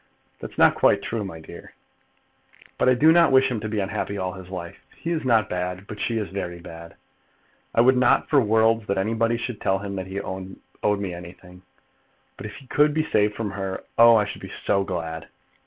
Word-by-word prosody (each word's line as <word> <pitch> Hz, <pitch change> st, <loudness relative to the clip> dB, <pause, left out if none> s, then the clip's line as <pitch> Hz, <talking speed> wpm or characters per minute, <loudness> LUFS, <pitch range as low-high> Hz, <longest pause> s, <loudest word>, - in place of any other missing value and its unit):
"That's -, -, -9 dB, 0.2 s
quite -, -, +3 dB
true, 115 Hz, -2 st, -3 dB
my 85 Hz, -5 st, -7 dB
dear." 80 Hz, -, -12 dB, 1.0 s
"But -, -, +4 dB
I 130 Hz, -, +5 dB
do 155 Hz, +6 st, +5 dB
not 170 Hz, -2 st, +5 dB
wish 135 Hz, 0 st, +4 dB
him 120 Hz, -, -2 dB
to 110 Hz, +1 st, -5 dB
be 105 Hz, 0 st, -2 dB
unhappy 100 Hz, +1 st, -3 dB
all 95 Hz, -1 st, -3 dB
his 95 Hz, -1 st, -11 dB
life. 85 Hz, -2 st, -7 dB, 0.2 s
He 170 Hz, -, -5 dB
is 165 Hz, -2 st, -1 dB
not 115 Hz, -5 st, +3 dB
bad, 90 Hz, +1 st, -4 dB
but 105 Hz, +1 st, -9 dB
she 115 Hz, +3 st, -1 dB
is 105 Hz, -3 st, -3 dB
very 90 Hz, -3 st, -5 dB
bad. 85 Hz, 0 st, -11 dB, 0.8 s
I 115 Hz, -, +5 dB
would 130 Hz, +2 st, +5 dB
not 125 Hz, -, +3 dB
for 145 Hz, -3 st, +4 dB
worlds 110 Hz, 0 st, +2 dB
that 100 Hz, -, -1 dB
anybody 115 Hz, +4 st, 0 dB
should 120 Hz, -1 st, -5 dB
tell 95 Hz, -, +1 dB
him 100 Hz, 0 st, -6 dB
that 95 Hz, 0 st, -5 dB
he 95 Hz, +1 st, -4 dB
owed 95 Hz, +2 st, -4 dB
me 95 Hz, -3 st, -4 dB
anything; 90 Hz, +1 st, -12 dB, 0.7 s
but -, -, -7 dB
if 105 Hz, -, -10 dB
he 135 Hz, -, -13 dB
could 150 Hz, +3 st, +2 dB
be 155 Hz, -, +2 dB
saved 105 Hz, -7 st, +1 dB
from 105 Hz, -2 st, -3 dB
her, 95 Hz, -1 st, -5 dB
oh, 115 Hz, 0 st, +7 dB
I 105 Hz, -2 st, +3 dB
should -, -, -7 dB
be -, -, -8 dB, 0.2 s
so 100 Hz, -, +2 dB
glad." 80 Hz, -3 st, -5 dB
105 Hz, 210 wpm, -24 LUFS, 95-115 Hz, 1.0 s, oh